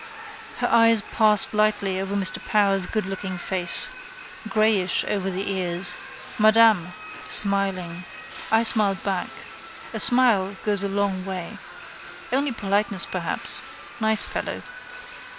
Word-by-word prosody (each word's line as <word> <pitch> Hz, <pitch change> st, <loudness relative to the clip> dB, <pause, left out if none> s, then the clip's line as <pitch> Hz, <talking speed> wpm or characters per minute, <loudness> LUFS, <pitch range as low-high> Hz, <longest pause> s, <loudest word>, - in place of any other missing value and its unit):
His -, -, -1 dB
eyes 230 Hz, -2 st, +4 dB
passed 215 Hz, -2 st, +3 dB
lightly 205 Hz, -3 st, 0 dB
over 195 Hz, +1 st, -4 dB
Mr 190 Hz, -4 st, +3 dB
Power's 195 Hz, -3 st, +1 dB
goodlooking 190 Hz, -3 st, -4 dB
face. 185 Hz, -, 0 dB, 0.6 s
Greyish 215 Hz, -4 st, +2 dB
over 195 Hz, -2 st, -2 dB
the 195 Hz, +2 st, -3 dB
ears. 180 Hz, -1 st, +1 dB, 0.4 s
Madame: 215 Hz, -5 st, +4 dB, 0.4 s
smiling. 190 Hz, -4 st, +3 dB, 0.5 s
I 225 Hz, +1 st, +3 dB
smiled 210 Hz, -4 st, +1 dB
back. 190 Hz, -3 st, -2 dB, 0.7 s
A -, -, -4 dB
smile 230 Hz, -7 st, +3 dB
goes 205 Hz, -2 st, 0 dB
a 200 Hz, -, -2 dB
long 195 Hz, -1 st, -2 dB
way. 185 Hz, -2 st, -7 dB, 0.7 s
Only 275 Hz, +1 st, +1 dB
politeness 200 Hz, -4 st, -1 dB
perhaps. -, -, -2 dB, 0.4 s
Nice 220 Hz, -1 st, +1 dB
fellow. -, -, -5 dB
200 Hz, 115 wpm, -22 LUFS, 190-215 Hz, 0.7 s, eyes